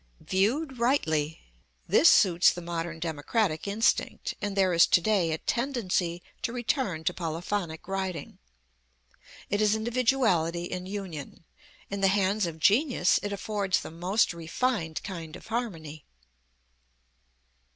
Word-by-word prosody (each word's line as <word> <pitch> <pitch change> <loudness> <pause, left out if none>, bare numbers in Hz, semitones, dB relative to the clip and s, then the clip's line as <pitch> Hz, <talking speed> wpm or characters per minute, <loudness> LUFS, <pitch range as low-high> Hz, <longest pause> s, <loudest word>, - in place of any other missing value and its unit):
Viewed 250 +8 0
rightly, 160 - +1 0.5
this - - +6
suits 180 -3 +5
the - - -6
modern 170 -1 -4
democratic 160 +3 -1
instinct, 210 +3 0
and 205 -1 -3
there 190 -2 +3
is 170 0 +6
to - - +5
day 190 -2 +1
a 160 - -1
tendency 190 - -1 0.2
to 230 - -2
return 240 - -1
to 180 - 0
polyphonic 170 0 -4
writing. 190 -5 -4 1.1
It 205 +1 +1
is 210 0 +3
individuality 220 -8 +1
in 180 +1 -5
union. 185 -8 -7 0.5
In 200 0 -3
the 195 - +5
hands 195 0 +2
of 165 -1 -6
genius 215 - +3
it 205 - -4
affords 200 -1 -1
the - - -8
most 180 +5 +1
refined 170 +1 -2
kind 165 -5 -7
of - - -12
harmony. 165 - -4
190 Hz, 130 wpm, -28 LUFS, 165-220 Hz, 1.1 s, this